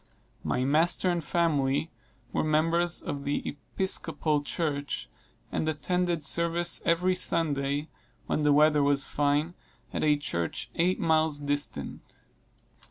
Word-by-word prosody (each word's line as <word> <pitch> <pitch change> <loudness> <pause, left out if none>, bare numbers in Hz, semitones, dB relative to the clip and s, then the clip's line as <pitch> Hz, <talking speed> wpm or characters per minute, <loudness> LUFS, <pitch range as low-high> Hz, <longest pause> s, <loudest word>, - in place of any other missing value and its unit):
My 125 - 0
master 165 +5 +2
and 170 -2 -2
family 150 -2 0 0.4
were - - +1
members 165 +3 +1
of 140 -1 -4
the 145 +1 -2
Episcopal 155 -1 -2
Church, 145 -2 -3 0.4
and 155 - -1
attended 175 0 -1
service 170 +1 +2
every 180 +2 +2
Sunday, 145 -4 0 0.4
when - - -1
the 150 0 +3
weather 150 0 +5
was 140 -1 +3
fine, 145 +3 0 0.4
at - - -2
a 150 -1 +4
church 85 -12 -3
eight 180 +2 +1
miles 160 -2 +2
distant. 145 0 -4
155 Hz, 120 wpm, -28 LUFS, 145-170 Hz, 0.4 s, weather